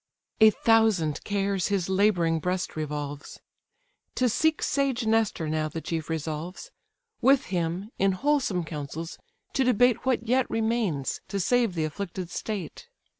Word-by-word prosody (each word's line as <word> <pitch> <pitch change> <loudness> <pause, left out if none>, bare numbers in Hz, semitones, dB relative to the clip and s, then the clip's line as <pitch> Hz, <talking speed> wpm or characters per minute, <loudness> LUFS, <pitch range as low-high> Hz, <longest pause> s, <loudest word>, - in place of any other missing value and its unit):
A 220 0 +9
thousand 215 -9 +2
cares 200 -2 0
his 195 -4 0
labouring 185 -4 +2
breast 180 +3 -2
revolves; 145 -2 -5 0.8
To 250 -1 +2
seek 315 +7 +1
sage 270 -4 0
Nestor 220 -7 +1
now 155 0 0
the 160 - -5
chief 160 -1 -4
resolves, 160 - -4 0.5
With 270 +2 +4
him, 175 +4 -2
in 195 0 +3
wholesome 255 -5 +1
counsels, 160 +1 -6 0.3
to 270 - +2
debate 245 -1 +3
What 250 -3 0
yet 255 +2 +2
remains 220 - -1
to 200 +1 -3
save 235 0 +2
the 160 - 0
afflicted 175 +2 -5
state. 215 - -5
195 Hz, 135 wpm, -27 LUFS, 165-230 Hz, 0.8 s, A